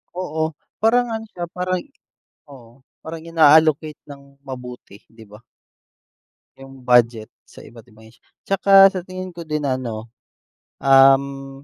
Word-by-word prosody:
Oo, 160 -3 -3 0.3
parang 245 +2 +3
ano 225 -1 -5
siya 175 -1 -6
parang 180 +1 -3 0.7
oo 125 0 -17 0.2
parang 160 0 -9
ina-allocate 155 -1 +3
ng 140 -1 -15
mabuti 125 -6 -10
'di 115 0 -17
ba? 105 +1 -16 1.2
'Yung 135 -1 -14
budget 120 -3 +2 0.2
sa - - -15
iba't 115 0 -16
ibang 110 -1 -20
ahensya, 110 - -22 0.2
at - - -81 0.2
saka 195 0 +1 0.2
sa 185 - -5
tingin 185 0 -8
ko 170 -1 -10
din 150 -1 -3
ano, 120 -5 -4 0.7
um, 135 0 +2
140 Hz, 135 wpm, -20 LUFS, 125-165 Hz, 1.2 s, parang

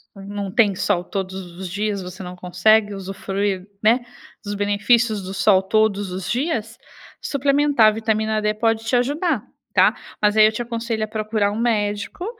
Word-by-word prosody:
Não 200 0 -6
tem 205 -2 +3
sol 180 -1 0
todos 190 -1 -4 0.2
os 185 -2 -6
dias, 205 +1 -2
você 185 +2 -8
não 180 0 -7
consegue 205 +4 +2
usufruir, 195 0 -3 0.2
né, 240 +3 +3 0.4
dos 205 0 -4
benefícios 205 +2 +2
do 190 +1 -6
sol 195 -1 +3
todos 205 -1 +1
os 185 0 -5
dias, 235 -4 -2 0.4
suplementar 280 -4 +3
a - - +6
vitamina 220 0 -1
D 210 0 +1
pode 225 0 0
te 230 - -3
ajudar, 285 - 0 0.3
tá. - - +4 0.3
Mas 210 0 +3
aí 215 - +8
eu 215 - +4
te 220 +2 -4
aconselho 230 -2 -3
a - - -13
procurar 215 -1 -1
um - - -4
médico 210 - -1
210 Hz, 170 wpm, -21 LUFS, 195-225 Hz, 0.4 s, aí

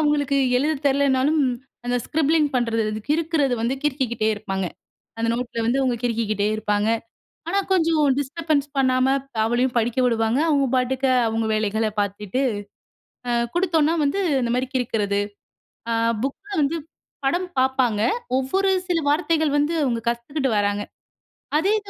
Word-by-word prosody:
அவுங்களுக்கு 290 -2 +1 0.2
எழுதத் 290 +2 0
தெரிலைன்னாலும், 280 +2 +2 0.5
அந்த 245 - +1
ஸ்க்ரிப்ளிங் 310 0 +2
பண்றது, 230 -2 +1 0.3
கிறுக்குறது 310 -4 +1
வந்து 240 +3 0
கிறுக்கிக்கிட்டே 260 -6 0
இருப்பாங்க. 195 -3 -3 0.5
அந்த 230 - 0
நோட்ல 240 -1 -3
வந்து 245 +4 +2
அவுங்க 255 -2 +1
கிறுக்கிக்கிட்டே 215 -3 0
இருப்பாங்க. 210 0 0 0.6
ஆனா 390 +4 +1
கொஞ்சம் 325 -4 +3
டிஸ்டர்பன்ஸ் 290 +1 -1
பண்ணாம, 255 -1 +3 0.4
அவளையும் 240 +3 +1
படிக்க 235 +2 -1
விடுவாங்க. 230 0 +1
அவுங்க 280 -3 +3
பாட்டுக்க 260 +1 0 0.2
அவுங்க 225 0 -1
வேலைகளை 215 +1 0
பாத்துட்டு, 205 +3 -2 0.9
அ - - 0 0.2
குடுத்தோம்ன்னா 330 -3 +2
வந்து, 285 +7 0 0.2
இந்த 235 -1 -1
மாரி 255 +1 0
கிறுக்குறது, 210 -5 0 0.7
அ - - +1 0.3
புக்ல 280 +10 -5
வந்து 290 +4 +1 0.5
படம் 350 +7 +1
பார்ப்பாங்க. 255 -5 +2 0.4
ஒவ்வொரு 380 +10 0 0.2
சில 350 - +2
வார்த்தைகள் 315 -1 +1
வந்து, 295 +3 +1
அவுங்க 235 -3 0
கத்துக்கிட்டு 265 +4 -1
வர்றாங்க. 205 0 0 0.8
அதே 370 +6 +2
இத 410 -1 -14
260 Hz, 130 wpm, -23 LUFS, 230-300 Hz, 0.9 s, கொஞ்சம்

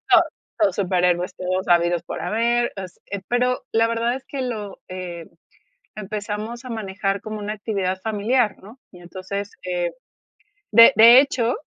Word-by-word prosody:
todos - - +6 0.3
todos 315 -2 +2
superhéroes 180 -2 +1
todos 185 +1 -2
habidos 175 0 +3
por - - -6
haber 235 +2 +1
así, 185 -3 -8 0.3
pero, 250 +1 +1
la 225 0 +3
verdad 230 +2 0
es 265 - -10
que 275 -2 -4
lo, 215 -5 -5
eh, 180 -3 -7 0.7
empezamos 215 +3 -5
a - - -7
manejar 195 -2 -3
como 215 0 -6
una 210 +1 -4
actividad 195 -3 -2
familiar, 220 +1 0
¿no?, 220 +7 -14
y 180 - -14
entonces, 190 +3 -6
eh, 175 -1 -2 0.8
de 230 +4 +8
de 235 +3 +9
hecho, 250 -3 -1
210 Hz, 150 wpm, -22 LUFS, 185-235 Hz, 0.8 s, de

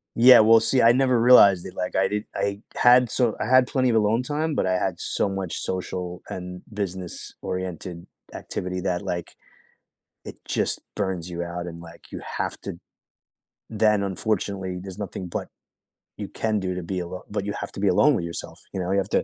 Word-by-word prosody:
Yeah, 120 0 +8
well, 115 +1 +7
see, 125 +3 +2
I 115 - +7
never 130 -1 +3
realized 100 -7 +7
it 95 - -8
like 90 - -3
I 95 - +3
did 105 +1 -2
I 100 0 -1 0.2
had 125 0 +5
so 120 -1 +1
I 110 - -2
had 130 0 +6
plenty 130 -2 +1
of 115 - +2
alone 110 +2 +2
time, 150 +3 -1
but - - 0
I 95 - +2
had 90 -2 -2
so - - 0
much 95 -3 -4
social 90 -1 -4
and 90 0 -7
business 95 -3 -5
oriented 90 -1 -5 0.3
activity 90 0 -4
that, 90 -1 -1
like, 85 -1 -5 0.9
it - - -9
just - - -1
burns 95 -4 -2
you 85 0 -4
out 85 0 -5
and, 85 -1 -8
like, 85 0 -14
you - - -6 0.2
have - - -2
to - - -5
d - - -13 0.9
Then 105 -2 +2
unfortunately, 95 -1 -2
there's 95 0 -8
nothing 95 -3 -5
but - - -4 0.7
you - - -5
can 110 -1 -1
do 95 -1 -3
to 90 - -4
be 90 +2 -3
alone 90 +1 -6
but 105 -1 -2
you 100 - -2
have 100 - -5
to - - -7
be 100 - +2
alone 145 +11 +4
with 95 - -2
yourself, 85 - -7
you 95 - -3
know, 90 +1 -2
you 100 - +2
have 95 - -3
to - - +1
95 Hz, 205 wpm, -24 LUFS, 90-110 Hz, 0.9 s, Yeah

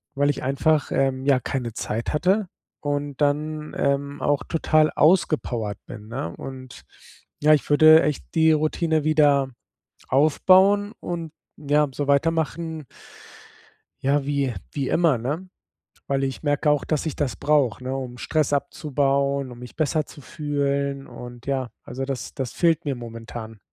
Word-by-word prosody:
weil 145 +1 +2
ich 145 - -2
einfach, 145 +3 +1
ähm, 135 -1 0
ja 140 -2 +4
keine 125 -1 -3
Zeit 115 +1 -3
hatte 190 +6 +2 0.3
und 145 -1 -3
dann, 150 +1 -1
ähm, 140 +1 -1
auch 145 -1 +1
total 155 -1 +2
ausgepowert 130 - +2
bin, 105 0 -9
ne? 100 -9 -4
Und 130 -1 -9 0.6
ja, 155 +1 +6
ich 150 - +1
würde 155 +2 +7
echt 150 -1 -1
die 160 0 +5
Routine 155 0 +1
wieder 145 -3 +4 0.6
aufbauen 190 +8 +4
und, 165 -3 -4 0.3
ja, 150 0 +2
so 145 +1 -3
weitermachen 160 +1 0 1.2
ja, 140 +1 +2
wie 140 -3 0 0.2
wie 140 -3 -2
immer, 165 -7 +3
ne? 150 +11 -4 0.6
Weil 135 0 0
ich 135 -1 -3
merke 145 0 +2
auch, 150 -2 +2
dass 155 -1 -1
ich 155 - -3
das 135 -6 -1
brauche, 140 -6 +1
ne, 130 +1 -3
um 125 -2 -6
Stress 155 +3 0
abzubauen, 140 -1 0
um 120 - -11
mich 125 -1 -10
besser 155 0 0
zu 145 - -13
fühlen 140 -1 -2
und, 120 0 -10
ja, 135 -3 -1
also 135 +2 -5
das 135 -2 -5
das 130 -4 -4
fehlt 165 -1 +2
mir 140 - -1
momentan. 115 -2 -8
145 Hz, 150 wpm, -24 LUFS, 135-155 Hz, 1.2 s, würde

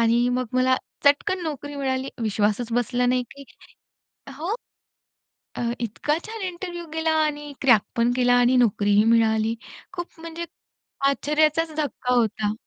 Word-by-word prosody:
आणि 235 +1 +3
मग 250 0 0
मला 255 0 +3 0.3
चटकन 295 +6 +3
नोकरी 290 -2 -5
मिळाली. 265 -1 -1
विश्वासच 215 +2 0
बसला 245 +1 +1
नाही 250 0 +2
की 280 0 -12 0.9
हो. 340 +6 -2 1.0
अ, - - -4 0.2
इतका 240 +7 -1
छान 445 0 -7
इंटरव्ह्यू 350 -1 -6
गेला 320 0 0
आणि 295 -1 -4
क्रॅक 240 -6 +6
पण 235 +1 +2
केला 245 -1 +3
आणि 245 +1 +4
नोकरीही 205 -3 +3
मिळाली. 225 -1 +3 0.4
खूप 350 -2 -7
म्हणजे 335 +1 -6 0.6
आश्चर्याचाच 305 +3 +2
धक्का 280 -4 -1
होता. 215 -2 +1
255 Hz, 135 wpm, -24 LUFS, 230-305 Hz, 1.0 s, क्रॅक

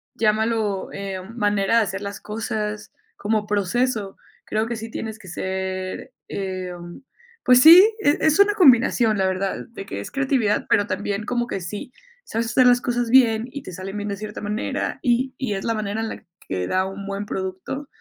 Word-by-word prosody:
llámalo, 215 -2 0
em, 195 +2 -6
manera 205 0 +2
de 230 - +5
hacer 190 0 -4
las 200 0 -6
cosas 215 -1 -4 0.2
como 210 0 -1
proceso, 210 +1 -1 0.3
creo 215 +1 -1
que 235 - -3
sí 225 0 -7
tienes 220 0 -5
que 190 - -14
ser, 190 +5 -4 0.2
em, 185 -1 -6 0.4
pues, 250 0 +6
sí, 335 +5 +11 0.2
e 290 -5 +3
es 315 +2 +3
una 405 +1 +6
combinación, 240 - +5
la 190 -1 +2
verdad, 190 +1 -2
de 210 -4 -9
que 100 - -6
es - - -8
creatividad, 265 -6 +1
pero 205 0 +3
también 200 +2 -3
como 240 0 -1
que 195 - -4
sí 205 +7 -6 0.3
sabes 230 +1 -2
hacer 250 +2 +4
las 245 0 +5
cosas 245 -1 -1
bien 230 -3 +5
y 285 0 -7
te - - -8
salen 190 +3 -6
bien 205 0 -4
de 200 - -3
cierta 210 +1 -7
manera, 210 +3 -3
y 255 0 +1
y 255 -6 -1
es 195 - -5
la 230 - +1
manera 215 0 -3
en 225 - -3
la - - -8 0.2
que 90 -1 -2
da 185 0 +1
un 195 +1 -7
buen 200 +1 -4
producto, 190 +9 -5
210 Hz, 190 wpm, -22 LUFS, 195-235 Hz, 0.4 s, sí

